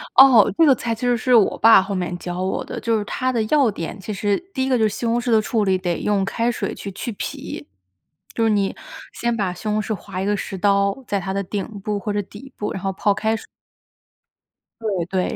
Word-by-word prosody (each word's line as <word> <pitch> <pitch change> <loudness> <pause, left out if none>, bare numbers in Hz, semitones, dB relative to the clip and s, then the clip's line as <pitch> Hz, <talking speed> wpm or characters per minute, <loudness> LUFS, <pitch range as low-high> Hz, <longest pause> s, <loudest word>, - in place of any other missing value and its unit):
哦， 260 -6 +8
这 330 - +6
个 280 - +7
菜 230 -1 -2
其 225 - -15
实 245 -1 +2
是 250 +2 +3
我 215 -4 +4
爸 225 -3 +7
后 195 +1 -4
面 180 -1 -2
教 175 0 -5
我 190 +1 -1
的， - - -6
就 230 -1 +1
是 210 - -2
它 255 +4 -1
的 235 - 0
要 270 +2 +3
点 195 0 -5
其 210 +3 -5
实 205 0 0 0.2
第 265 - -1
一 265 - -1
个 255 - +3
就 220 - +1
是 - - -1
西 235 - -5
红 230 +1 +2
柿 240 0 -2
的 220 - +5
处 215 0 0
理， 190 -1 +2
得 175 -2 -2
用 205 -2 +1
开 230 +4 0
水 - - -3
去 200 - -7
去 230 +5 -5
皮， - - -6 0.7
就 230 - 0
是 225 - +3
你 200 -2 +1 0.4
先 235 0 -1
把 195 -5 -1
西 215 - -8
红 215 0 +1
柿 220 - -3
划 190 -2 -6
一 - - -1
个 205 +1 +1
“十” 195 - -5
刀， 200 +5 +1
在 200 - 0
它 190 0 -4
的 200 0 -1
顶 200 +2 -3 0.2
部 205 0 -2
或 210 - -3
者 205 - 0
底 210 +7 -13
部， 210 - -3
然 190 - -5
后 195 - -1
泡 205 +2 +1
开 220 +2 0
水。 - - -8 1.4
对， 195 -6 -1 0.2
对， - - -4
210 Hz, 270 characters per minute, -21 LUFS, 195-230 Hz, 1.4 s, 哦